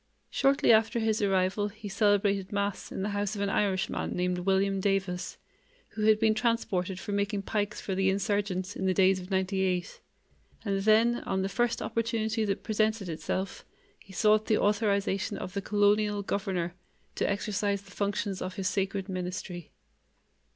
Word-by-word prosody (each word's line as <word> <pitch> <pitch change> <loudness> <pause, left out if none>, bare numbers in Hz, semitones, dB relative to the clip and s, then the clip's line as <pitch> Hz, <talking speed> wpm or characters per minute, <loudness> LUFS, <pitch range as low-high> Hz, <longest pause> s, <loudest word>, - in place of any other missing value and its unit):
Shortly 275 -3 +3
after 225 +1 +4
his 220 -1 +1
arrival 195 +1 +1
he 210 +1 -9
celebrated 200 -1 +2
Mass 200 0 -2
in 190 - -3
the 205 - -1
house 205 0 -1
of 200 - -4
an 200 -1 0
Irishman 195 0 0
named 180 0 0
William 195 +1 +1
Davis, 195 -2 -1 0.5
who 215 -1 -3
had 215 -1 +5
been 220 -1 +4
transported 210 -5 -1
for 205 - -6
making 200 0 -1
pikes 210 0 -2
for 195 - -4
the 190 0 +2
insurgents 195 -1 -1
in 190 - -2
the 185 - +2
days 190 0 +4
of 180 0 -9
'98, 190 -2 -1 0.7
and 195 -1 0
then, 220 +3 +4
on 190 0 0
the - - 0
first 240 +3 0
opportunity 225 -1 -1
that 195 -1 -2
presented 215 -3 0
itself, 185 +4 -3 0.4
he 195 - -17
sought 215 +2 +3
the 215 - +3
authorization 205 -1 +1
of 185 - -6
the 200 - -2
colonial 205 0 +2
governor 190 -4 -2 0.4
to - - -1
exercise 200 0 -1
the 195 - -17
functions 200 -1 -2
of 185 0 -4
his 195 -3 -2
sacred 195 -1 -1
ministry. 180 -2 -5
200 Hz, 165 wpm, -29 LUFS, 190-210 Hz, 0.7 s, had